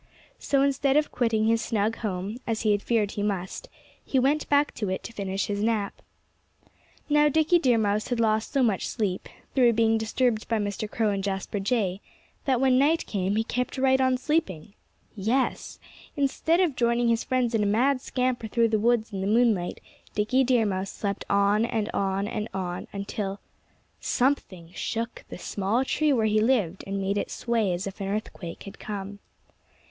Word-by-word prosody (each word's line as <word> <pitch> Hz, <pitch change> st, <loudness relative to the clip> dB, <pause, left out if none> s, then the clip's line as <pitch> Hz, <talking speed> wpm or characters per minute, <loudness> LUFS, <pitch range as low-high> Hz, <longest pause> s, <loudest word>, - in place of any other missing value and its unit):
So 275 Hz, -1 st, +2 dB
instead 275 Hz, 0 st, +2 dB
of 300 Hz, -, +1 dB
quitting 225 Hz, -3 st, +1 dB
his 225 Hz, 0 st, +3 dB
snug 215 Hz, 0 st, 0 dB
home 200 Hz, 0 st, -3 dB
as 225 Hz, -1 st, -1 dB
he 215 Hz, -, +2 dB
had 205 Hz, -1 st, +1 dB
feared 215 Hz, -3 st, +1 dB
he 205 Hz, -, -4 dB
must 200 Hz, -, -3 dB, 0.3 s
he 270 Hz, -, -1 dB
went 280 Hz, +4 st, +2 dB
back 290 Hz, 0 st, +3 dB
to 210 Hz, -4 st, -3 dB
it 185 Hz, -, -3 dB
to 230 Hz, -, -8 dB
finish 195 Hz, -2 st, -2 dB
his 205 Hz, 0 st, -2 dB
nap. 215 Hz, -2 st, -1 dB, 1.1 s
Now, 295 Hz, 0 st, +4 dB
Dickie 320 Hz, +4 st, +3 dB
Deer 250 Hz, -7 st, +3 dB
Mouse 210 Hz, -1 st, 0 dB
had 245 Hz, -2 st, -1 dB
lost 220 Hz, -1 st, +1 dB
so 275 Hz, -2 st, +2 dB
much 215 Hz, -6 st, +1 dB
sleep 200 Hz, -5 st, -2 dB, 0.2 s
through 245 Hz, -3 st, +5 dB
being 225 Hz, 0 st, +3 dB
disturbed 220 Hz, 0 st, 0 dB
by 225 Hz, -, +1 dB
Mr. 205 Hz, 0 st, -3 dB
Crow 220 Hz, -2 st, 0 dB
and 195 Hz, -1 st, -2 dB
Jasper 195 Hz, +1 st, -2 dB
Jay 195 Hz, -3 st, 0 dB, 0.4 s
that 260 Hz, -3 st, +2 dB
when 260 Hz, -1 st, +4 dB
night 315 Hz, +4 st, +3 dB
came 195 Hz, -1 st, -1 dB
he 220 Hz, -, +2 dB
kept 250 Hz, +3 st, -3 dB
right 265 Hz, 0 st, +3 dB
on 260 Hz, -1 st, +3 dB
sleeping. 215 Hz, -, -1 dB, 0.4 s
Yes! 230 Hz, +6 st, -1 dB, 0.4 s
Instead 295 Hz, +4 st, +1 dB
of 335 Hz, -7 st, +1 dB
joining 235 Hz, 0 st, +2 dB
his 230 Hz, 0 st, +1 dB
friends 250 Hz, -2 st, 0 dB
in 225 Hz, -, +2 dB
a 205 Hz, -, +2 dB
mad 255 Hz, +6 st, +2 dB
scamper 250 Hz, -3 st, -1 dB
through 230 Hz, +1 st, +2 dB
the 215 Hz, -1 st, +1 dB
woods 225 Hz, -1 st, +1 dB
in 190 Hz, -, -3 dB
the 195 Hz, -, -1 dB
moonlight, 215 Hz, -5 st, +2 dB, 0.4 s
Dickie 235 Hz, +6 st, +2 dB
Deer 245 Hz, -3 st, +3 dB
Mouse 190 Hz, -1 st, -2 dB
slept 200 Hz, -1 st, -4 dB
on 200 Hz, +2 st, +3 dB
and 225 Hz, -2 st, -1 dB
on 195 Hz, 0 st, 0 dB
and 215 Hz, -1 st, -3 dB
on, 180 Hz, -2 st, -4 dB
until 200 Hz, 0 st, -4 dB, 0.6 s
something 195 Hz, -10 st, -1 dB
shook 230 Hz, +5 st, -4 dB
the -, -, -7 dB
small 200 Hz, +7 st, -1 dB
tree 305 Hz, +2 st, +1 dB
where 230 Hz, -5 st, +2 dB
he 215 Hz, 0 st, +3 dB
lived 215 Hz, -7 st, +1 dB
and 195 Hz, 0 st, -2 dB
made 195 Hz, +1 st, 0 dB
it -, -, -3 dB
sway 230 Hz, -5 st, 0 dB
as 175 Hz, +2 st, -2 dB
if 195 Hz, +1 st, -7 dB
an 195 Hz, -, -2 dB
earthquake 195 Hz, -4 st, -5 dB
had 200 Hz, -, -11 dB
come. 200 Hz, -1 st, -6 dB
220 Hz, 185 wpm, -26 LUFS, 200-250 Hz, 1.1 s, through